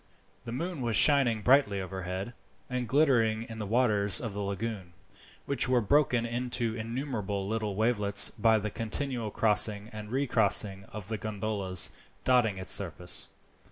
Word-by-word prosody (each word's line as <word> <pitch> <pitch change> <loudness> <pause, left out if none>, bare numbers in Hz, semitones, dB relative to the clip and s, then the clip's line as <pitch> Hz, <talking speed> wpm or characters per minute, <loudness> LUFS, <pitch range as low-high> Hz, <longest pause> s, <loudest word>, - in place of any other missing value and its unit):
The 115 - -6
moon 165 +4 -5
was 115 -3 -1
shining 130 -7 +3
brightly 125 -7 +3
overhead, 95 +3 -6 0.4
and 125 -1 -3
glittering 115 -6 +2
in 115 -1 -10
the 105 - -5
waters 105 -4 +2
of 115 -4 -6
the 100 - -5
lagoon, 100 -2 -5 0.5
which 135 -2 0
were 125 -1 +3
broken 125 0 +1
into 120 -1 -2
innumerable 115 -4 -4
little 105 -2 -3
wavelets 105 -2 +3
by 110 0 +2
the 105 0 -4
continual 115 +1 -4
crossing 105 0 +3
and 105 -1 -8
recrossing 105 -7 +2
of 105 -2 -10
the 110 -2 -4
gondolas 100 -4 0 0.3
dotting 120 -6 +2
its 95 -1 -1
surface. - - +1
110 Hz, 145 wpm, -28 LUFS, 100-125 Hz, 0.5 s, shining